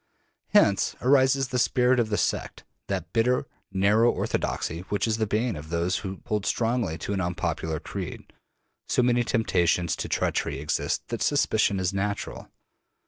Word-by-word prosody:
Hence 100 -1 +3
arises 135 0 +3
the 125 - 0
spirit 125 0 +3
of 115 -2 +1
the 105 - 0
sect, - - -2 0.2
that 90 -4 -4
bitter, 125 +4 +2 0.3
narrow 105 +5 +4
orthodoxy 80 - -2
which 100 +2 0
is 110 -1 0
the 110 -1 0
bane 110 +1 0
of 75 +1 -9
those 85 +3 0
who 95 -2 -6
hold 105 -3 -1
strongly 115 -8 0
to 95 +5 -4
an 95 - -1
unpopular 85 -3 -2
creed. - - -7 0.6
So 125 - +3
many 120 0 +3
real 120 - +1
temptations 90 -8 +1
to - - -4
treachery - - -1
exist 75 +2 -2
that - - -4
suspicion 100 - +2
is 95 +1 0
natural. 100 +1 -3
100 Hz, 160 wpm, -26 LUFS, 90-120 Hz, 0.6 s, narrow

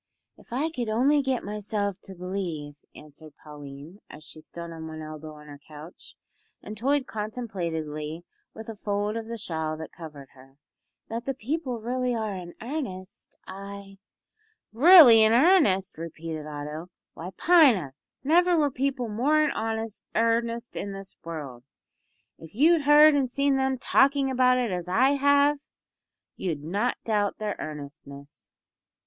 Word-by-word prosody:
"If - - -21
I 290 +7 -1
could 240 -7 -4
only 270 +7 +3
get 265 -2 -1
myself 205 -1 -3
to 190 - -10
believe," 175 -5 -5 0.2
answered 150 0 -14
Pauline, 145 +4 -11
as 155 - -12
she 155 0 -13 0.2
leaned 170 0 -6
on 160 -1 -8
one 155 0 -8
elbow 155 0 -9
on 150 0 -14
her 145 -1 -12
couch, 155 +3 -13 0.4
and 210 - -9
toyed 270 +5 0
contemplatively 170 - -5 0.3
with 220 - -9
a 225 - -7
fold 205 +1 -2
of 225 -1 -5
the 230 0 -5
shawl 160 -6 -3
that 160 0 -8
covered 150 -5 -11
her, 135 +1 -19 0.5
"that 230 +1 -5
the 270 - -2
people 270 +2 -3
are 230 - -9
really 250 +2 -1
in 195 -6 -4
earnest, 230 -9 -7
I 195 0 -10 0.4
" 435 - -43 0.2
"Really 255 -12 +10
in 220 +1 +5
earnest!" 235 - +3
repeated 160 -2 -6
Otto. 150 +3 -7 0.2
"Why, 170 +3 -7
Pina, 260 - +4 0.3
never 345 +4 +4
were 295 -3 +2
people 260 -2 -2
more 255 +9 +1
in 300 - +1
earnest 230 +1 -2
in 200 0 -4
this 195 0 -10
world. 145 -7 -7 0.8
If 165 +3 -13
you'd 320 +6 +4
heard 300 +1 +7
and 275 -3 +1
seen 280 +2 +1
them 265 0 0
talking 270 +1 +2
about 255 0 +3
it 245 -4 -1
as 180 -1 -4
I 235 +9 +3
have, 285 +1 +3 0.8
you'd 160 -6 -4
not 205 +10 -1
doubt 205 -3 0
their 210 -2 -3
earnestness. 140 -1 -10
210 Hz, 150 wpm, -26 LUFS, 160-255 Hz, 0.8 s, Really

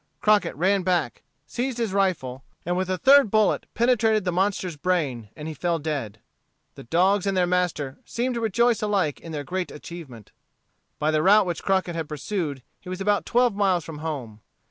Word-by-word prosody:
Crockett 210 -5 +2
ran 190 +6 +2
back, 175 -9 -1 0.2
seized 245 - -3
his 230 -5 -2
rifle, 155 -10 -1 0.2
and 175 +1 0
with 185 0 -1
a 185 - 0
third 275 +1 +6
bullet 215 0 +2
penetrated 225 -3 +2
the 180 - +1
monster's 185 -1 -1
brain 145 - -1
and 150 - -7
he 160 - -4
fell 170 +2 -1
dead. 145 -9 -4 0.6
The - - -11
dogs 190 +8 +2
and 195 -1 0
their 180 - +3
master 175 -7 -1
seemed 250 +2 -2
to 235 - -3
rejoice 230 +1 +2
alike 200 -8 0
in 165 - -10
their 150 -2 -4
great 180 +5 -3
achievement. 150 - -10 0.7
By 155 +1 +1
the 155 0 +2
route 205 +4 +5
which 175 -2 -3
Crockett 190 -2 0
had 165 -2 -4
pursued, 150 -3 -3 0.2
he 180 - -11
was 185 0 -5
about 205 +1 +1
twelve 245 -1 +3
miles 190 -5 +1
from 155 -2 -8
home. 130 -9 -5
180 Hz, 190 wpm, -24 LUFS, 155-205 Hz, 0.7 s, third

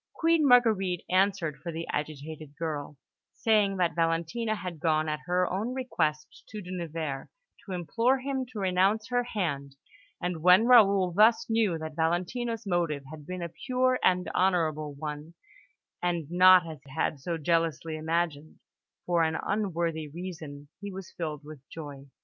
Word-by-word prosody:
Queen 330 -2 +3
Marguerite 215 -8 +4
answered 185 -5 +1
for 170 +2 -5
the 165 +1 -5
agitated 150 0 -5
girl, 150 -3 -4 0.4
saying 210 -3 +2
that 175 -2 +1
Valentina 170 +7 0
had 180 -5 -6
gone 155 -1 +1
at 150 0 -2
her 180 0 +2
own 215 +8 -2
request 155 -12 -2
to 215 - -7
De 180 -2 -8
Nevers, 160 -6 -4 0.4
to 200 - -10
implore 230 +9 +1
him 265 0 -2
to 235 - -11
renounce 195 +4 +1
her 245 0 +2
hand; 145 - -3 0.4
and 180 -2 -3
when 180 +6 +6
Raoul 200 -7 +6
thus 215 +5 +4
knew 220 -7 +2
that 155 -1 -7
Valentina's 200 +8 -1
motive 170 -6 0
had 150 -2 -10
been 185 -1 -5
a 170 - -5 0.2
pure 255 0 +2
and 180 -1 +3
honourable 155 -5 0
one, 150 +2 -6 0.7
and 170 -3 -2
not 180 0 +7
as 155 -3 -8
he 140 0 -14
had 155 -2 0
so 165 +5 -3
jealously 165 -1 0
imagined, 160 -1 -2 0.5
for 175 -1 +2
an 160 0 +1
unworthy 170 -6 -1
reason, 155 -3 -8
he 200 0 -6
was 190 -1 -9
filled 155 -3 -4
with 150 -2 -11
joy. 145 -4 -9
175 Hz, 155 wpm, -28 LUFS, 155-200 Hz, 0.7 s, not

